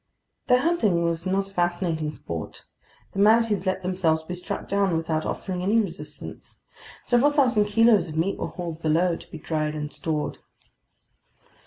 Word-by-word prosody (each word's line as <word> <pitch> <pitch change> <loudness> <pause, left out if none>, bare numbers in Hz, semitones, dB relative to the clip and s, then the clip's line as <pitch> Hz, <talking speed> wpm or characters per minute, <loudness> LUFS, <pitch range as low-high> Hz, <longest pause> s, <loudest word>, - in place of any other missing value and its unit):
Their 250 -1 +5
hunting 220 - +2
was 170 +1 -1
not 195 +1 0
a - - -21
fascinating 175 -3 0
sport. 85 - -7 0.5
The 195 - -5
manatees 210 -2 +4
let 185 - -1
themselves 175 -4 +1
be 180 - -6
struck 180 0 -5
down 195 -4 +1
without 160 -1 -1
offering 185 -2 -3
any 205 +5 +3
resistance. 160 -7 -6 0.4
Several 245 +4 +4
thousand 255 -8 +3
kilos 210 -3 +4
of 155 -1 -6
meat 175 +5 0
were - - -2
hauled 170 -3 -6
below, 165 +3 +2
to - - -12
be - - -8
dried 155 0 -2
and 150 -1 -5
stored. 155 -2 -3
180 Hz, 160 wpm, -25 LUFS, 160-205 Hz, 0.5 s, Their